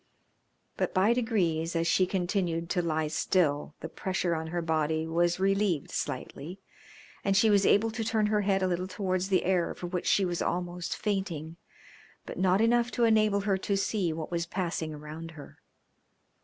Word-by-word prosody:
But - - -1
by 195 +5 +4
degrees 175 -9 0
as 165 0 +1
she 180 +2 +3
continued 175 -3 -1
to 180 - +1
lie 160 -2 -1
still 150 -2 0
the - - -4
pressure 180 +1 -2
on 160 0 -3
her 170 +1 -3
body 160 0 0
was 175 +2 +1
relieved 195 -5 +1
slightly, 170 +8 -5 0.6
and 195 -1 +2
she 215 +1 +5
was 200 -1 +4
able 225 +2 +4
to 225 0 -3
turn 220 -1 +1
her 210 0 +2
head 195 -1 +1
a - - +2
little 180 0 -1
towards 185 -1 -2
the 190 - +2
air 180 -2 +1
for - - -7
which 175 0 -3
she 195 - +3
was 175 -1 -2
almost 175 0 -2
fainting, 175 -6 -3 0.7
but - - -7
not 185 +2 +3
enough 235 +1 +3
to 240 - +1
enable 215 -3 +3
her 195 -1 0
to 200 +1 -1
see 195 -3 0
what 160 +1 -5
was 170 -1 -1
passing 170 -3 -3
around 155 +2 -8
her. 145 - -12
180 Hz, 180 wpm, -29 LUFS, 165-200 Hz, 0.7 s, she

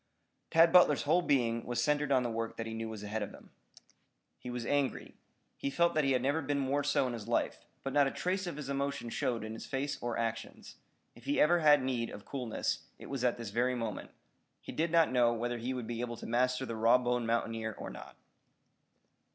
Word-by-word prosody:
Tad 165 +1 +5
Butler's 175 -5 +6
whole 160 +5 +3
being 120 -7 +1
was 120 -1 -3
centered 150 +2 +1
on 130 -2 +4
the 120 - -1
work 115 0 -3
that 115 - -3
he 115 - -5
knew 115 0 -4
was 110 -2 -7
ahead 105 +1 -3
of 105 - -3
him. - - -17 0.9
He 125 - -8
was 120 -1 -4
angry. 145 -1 -1 0.4
He - - -2
felt 170 +5 +2
that 155 - +2
he 135 -1 +2
had 125 -1 +1
never 145 +4 +1
been 145 0 -1
more 140 +1 0
so 145 -2 +2
in 125 - -2
his 115 -3 -7
life, - - -1 0.2
but 135 - -3
not 145 -1 +5
a - - +1
trace 185 +1 -2
of 175 - -4
his 150 -3 -6
emotion 140 -3 -2
showed 115 -2 -1
in 110 0 -5
his 110 - -8
face 140 +2 -3
or 120 -1 -2
actions. 115 -1 -4 0.4
If - - -17
he 145 - 0
ever 175 +3 +5
had 150 -4 +5
need 125 -3 -1
of 105 - -10
coolness, 125 -5 -3
it - - -10
was 135 -3 -3
at 125 -1 +2
this 115 -4 -6
very 125 +3 +1
moment. 115 -4 -4 0.5
He - - -9
did 165 +2 0
not 165 -3 +4
know 120 -2 +4
whether 120 +1 -2
he 120 +3 -3
would 125 -3 -4
be 115 +1 -4
able 120 -1 -4
to - - -8
master 125 +2 +1
the 115 - -4
raw 115 +3 +5
boned 125 -1 -1
mountaineer 115 -2 -1
or - - -6
not. - - -10
125 Hz, 230 wpm, -32 LUFS, 115-145 Hz, 0.9 s, Butler's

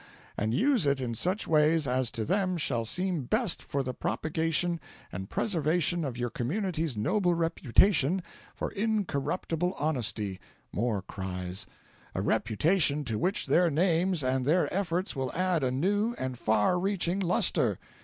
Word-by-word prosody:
and 110 +2 -1
use 245 - +3
it 140 -1 +2
in 125 -3 -2
such 185 - -1
ways 155 0 +3
as 130 -1 0
to 110 -2 -3
them 185 0 +1
shall 120 -7 0
seem 180 - 0
best 215 - 0
for 140 -1 -2
the 130 -1 -4
propagation 160 +8 -1 0.3
and 95 +2 -6
preservation 170 -2 +1
of 130 -5 -4
your 120 -1 -2
community's 160 - -2
noble 175 - +1
reputation 165 - +2 0.3
for - - -3
incorruptible 180 -4 -1
honesty 115 -10 -2 0.3
(more 110 -3 -1
cries) 90 -1 -5 0.5
a - - 0
reputation 150 - +2
to 110 -4 -2
which 190 +3 +1
their 175 0 +3
names 170 +1 +2
and 130 0 +1
their 160 +7 +2
efforts 185 0 -1
will 130 -2 -2
add 180 -4 +1
a 130 - +2
new 205 - 0
and 130 -2 -4
far 110 - +2
reaching 190 -1 0
lustre." 180 -2 +2
160 Hz, 145 wpm, -29 LUFS, 125-185 Hz, 0.5 s, use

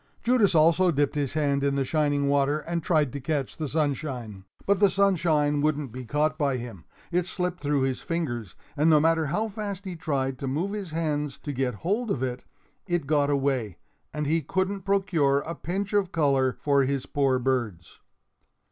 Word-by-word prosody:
Judas 235 -7 +3
also 165 +4 +5
dipped 145 -3 +1
his 145 -3 -1
hand 140 -2 +1
in 140 0 +1
the 135 -1 0
shining 145 -1 +1
water 140 +1 +2
and 170 +2 -3
tried 155 -6 +1
to 140 - -4
catch 140 -1 -2
the 155 - -3
sunshine. 135 -9 -3 0.2
But 200 0 +2
the 200 -1 +5
sunshine 165 -7 +2
wouldn't 150 -3 0
be 130 +2 -7
caught 150 +5 0
by 140 -3 +1
him. 115 -9 -8 0.3
It 175 0 +1
slipped 180 -1 -2
through 145 -1 +1
his 130 -1 -1
fingers; 120 - -3 0.2
and 155 +2 +3
no 155 -2 +6
matter 160 0 +2
how 215 +10 0
fast 200 -2 -5
he 185 -2 -5
tried 135 -5 -2
to 135 - -4
move 160 +9 -1
his 205 -4 -5
hands 150 -3 -2
to 145 - -4
get 130 -2 -1
hold 220 +6 0
of 130 -9 -1
it, 125 -1 -3 0.4
it 175 -4 0
got 145 0 +2
away, 135 - 0 0.3
and 150 0 -3
he 160 +3 +1
couldn't 190 +5 -2
procure 175 -9 +2
a 165 - -5
pinch 195 +4 -4
of 200 -3 +1
color 140 -6 +2
for 140 +1 +1
his 135 0 -1
poor 135 -3 +1
birds. 120 -10 -2
150 Hz, 190 wpm, -26 LUFS, 135-170 Hz, 0.4 s, no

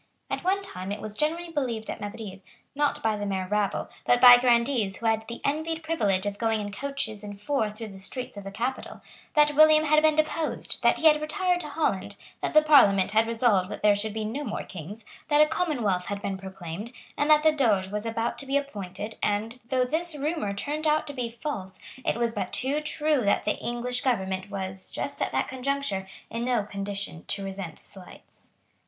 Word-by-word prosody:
At - - -2
one 390 +2 +1
time 185 - -6
it 205 - -3
was 215 -1 -6
generally 330 +7 -1
believed 245 -8 -2
at - - -5
Madrid, 205 -2 -7 0.3
not 290 0 0
by 220 -1 +2
the 205 - -3
mere 190 -2 -2
rabble, 210 0 0 0.2
but 245 - +3
by 245 -1 +10
Grandees 235 -4 +2
who 230 - -8
had 220 0 +1
the 235 - -7
envied 320 +3 -1
privilege 205 -13 0
of 205 0 -3
going 225 -1 +1
in 205 -1 -4
coaches 220 -2 -4
and 205 -1 -8
four 220 0 0
through 215 +1 -8
the 195 -1 -11
streets 250 +6 -6
of 200 - -7
the 195 - -6
capital, 245 +6 -4 0.3
that 295 0 +5
William 310 +1 +7
had 305 0 +4
been 310 -1 +4
deposed, 310 +1 0
that - - +4
he - - -3
had 300 -1 +6
retired 360 +3 0
to 305 - -5
Holland, 200 -10 -1 0.3
that - - -2
the 310 - +8
Parliament 200 -11 +6
had 220 +1 +3
resolved 225 -5 +2
that - - -7
there 210 -1 +6
should 205 +2 -2
be 220 -1 -2
no 250 +7 -3
more 225 - -3
kings, 200 +5 -9 0.2
that 295 -1 +3
a 305 - +8
commonwealth 250 - 0
had 200 0 -3
been 200 -1 -3
proclaimed, 190 +2 -7 0.2
and 290 - 0
that 305 0 +6
a 315 - +7
Doge 215 -10 +2
was 210 +2 -3
about 225 +1 -2
to 275 - -6
be 275 +1 +2
appointed 210 -6 -5
and, 215 +4 -1
though 255 -1 +2
this 320 +4 -2
rumour 295 -7 -2
turned 295 +10 -3
out 305 0 +2
to 285 - -7
be 250 -3 -3
false, 230 -6 -5 0.3
it - - +1
was 235 -1 0
but 185 - -3
too 280 +4 0
true 305 -2 +1
that 200 - +2
the 210 - -1
English 245 +1 -2
government 190 -6 -1
was, 190 -1 -5
just - - -4
at - - 0
that - - 0
conjuncture, 260 -7 -2 0.2
in 230 +1 -3
no 245 -3 +1
condition 200 -4 -5
to 200 - -2
resent 195 -4 -6
slights. 190 -3 -12
230 Hz, 210 wpm, -27 LUFS, 200-290 Hz, 0.3 s, by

